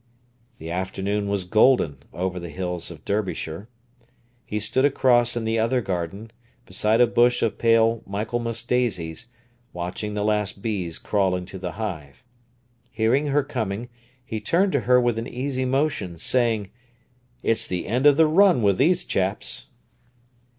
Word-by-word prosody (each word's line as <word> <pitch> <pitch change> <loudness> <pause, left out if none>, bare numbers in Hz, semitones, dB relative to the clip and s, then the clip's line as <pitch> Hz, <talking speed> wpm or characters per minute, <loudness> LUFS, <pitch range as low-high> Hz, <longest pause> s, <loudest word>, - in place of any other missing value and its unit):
The 80 +1 -7
afternoon 95 +3 -2
was 100 -2 -1
golden 105 - +3
over 90 +1 -3
the 85 -1 -7
hills 90 0 -4
of 80 -3 -12
Derbyshire. 100 -2 -3 0.8
He 105 - -2
stood 110 +5 0
across 120 -4 +3
in 115 - -2
the 110 0 0
other 115 +3 +2
garden, 95 +1 -4 0.3
beside 105 +4 +1
a - - +8
bush 120 +1 +3
of 115 - -1
pale 115 0 +3
Michaelmas 115 +3 -2
daisies, 115 -6 -1 0.5
watching 90 +4 -4
the 105 - -1
last 105 -2 0
bees 95 -7 -3
crawl 95 -3 0
into 90 +1 -6
the 90 -2 -5
hive. 85 - -6 0.7
Hearing 125 +7 +1
her 145 0 +2
coming, 115 -3 -4 0.4
he 110 -3 -4
turned 185 - +2
to 140 - +2
her 125 0 +7
with 120 -2 +1
an 115 - -5
easy 130 +1 -2
motion, 125 - -1
saying: 110 0 0 0.7
"It's 115 - +1
the 90 -1 -3
end 125 +7 +2
of 145 -1 +6
the 160 - +6
run 170 - +4
with 100 -2 +2
these 175 +6 +3
chaps." 95 - -2
110 Hz, 150 wpm, -24 LUFS, 95-120 Hz, 0.8 s, a